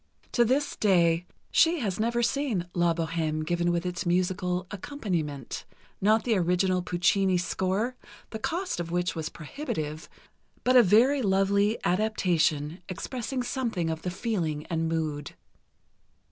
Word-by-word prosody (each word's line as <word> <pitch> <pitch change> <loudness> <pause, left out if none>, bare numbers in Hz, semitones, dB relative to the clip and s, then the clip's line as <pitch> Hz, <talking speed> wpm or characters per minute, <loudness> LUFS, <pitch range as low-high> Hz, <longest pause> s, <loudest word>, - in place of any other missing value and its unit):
To 240 - +4
this 265 +5 +1
day, 175 -4 +3 0.2
she 335 +1 +4
has 200 -4 -2
never 235 +2 +1
seen 235 -8 0
"La 175 -1 +3
Bohême" 160 -1 -1
given 175 +1 +1
with 175 +1 -1
its 175 -1 -2
musical 180 +1 0
accompaniment—not 195 - -2
the 230 -3 +2
original 180 +1 +2
Puccini 180 +2 +2
score, 190 +7 -1 0.4
the 220 - -5
cost 345 - -2
of 170 -1 -3
which 175 0 0
was 160 -1 -4
prohibitive, 155 - -5 0.5
but 255 +1 +3
a 250 - +10
very 240 +7 +4
lovely 200 +1 +2
adaptation 175 -6 +1
expressing 250 +8 -3
something 230 -11 -1
of 160 0 -4
the 180 - -3
feeling 175 -7 -2
and 165 -1 0
mood. 155 -3 -3
180 Hz, 130 wpm, -27 LUFS, 170-220 Hz, 0.5 s, a